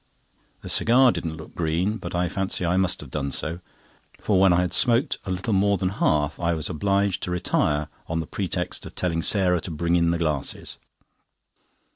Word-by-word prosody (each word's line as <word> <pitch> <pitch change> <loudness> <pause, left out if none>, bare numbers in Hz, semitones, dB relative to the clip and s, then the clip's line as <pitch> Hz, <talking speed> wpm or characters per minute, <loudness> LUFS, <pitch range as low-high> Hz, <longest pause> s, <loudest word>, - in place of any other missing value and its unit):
The - - -7
cigar 125 +2 +5
didn't 80 -6 -4
look 80 - -11
green, 85 +6 0
but 90 -3 -6
I 90 0 +1
fancy 95 -1 -1
I 85 +1 +1
must 95 -1 +1
have 70 -4 -11
done 70 -1 -2
so; 80 +4 -3 0.6
for 100 -3 +1
when 95 -1 +5
I 85 0 +4
had 90 - -2
smoked 120 +1 +2
a - - -6
little 95 +4 -2
more 100 +1 +3
than 90 0 0
half 75 -6 0
I 85 -1 +1
was 80 - -2
obliged 100 +3 0
to - - -4
retire 75 -4 0 0.2
on 80 0 -2
the 80 - -3
pretext 90 0 -4
of - - -13
telling 85 -2 -1
Sarah 90 -2 +3
to - - -6
bring 85 +2 0
in 85 -1 +3
the 85 - +1
glasses. 75 -5 -3
90 Hz, 195 wpm, -24 LUFS, 80-95 Hz, 0.6 s, cigar